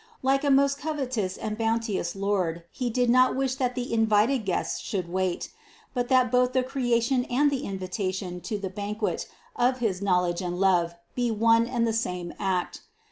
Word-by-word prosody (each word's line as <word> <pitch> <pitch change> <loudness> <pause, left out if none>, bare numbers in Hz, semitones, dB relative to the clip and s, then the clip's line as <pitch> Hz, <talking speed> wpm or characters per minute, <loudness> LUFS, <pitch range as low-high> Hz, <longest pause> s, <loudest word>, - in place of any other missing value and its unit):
Like 270 +2 +2
a 285 - +2
most 275 +1 +3
courteous 260 -11 -2
and 215 0 -3
bounteous 225 -6 -1
Lord 190 -4 -1
He 250 -2 -2
did 245 +1 +1
not 255 +2 +4
wish 265 -1 0
that 250 -2 -1
the 245 -2 -3
invited 225 +2 +3
guests 185 - -1
should 185 -4 -3
wait, 185 0 -2 0.4
but 245 -2 -1
that 255 -2 +3
both 250 0 +3
the 255 - +2
creation 245 -1 +1
and 285 +4 +2
the 275 0 -2
invitation 185 -1 -4
to 210 - -3
the 195 -2 -5
ban 205 +2 -4
quet 215 -1 -2 0.3
of 250 +1 +2
his 210 -7 -1
knowledge 180 -2 +1
and 180 0 -3
love 175 -3 +2 0.2
be 245 -1 0
one 230 +1 +3
and 240 -2 0
the 225 - 0
same 180 -6 -2
act. 185 -2 -1
225 Hz, 185 wpm, -26 LUFS, 190-250 Hz, 0.4 s, not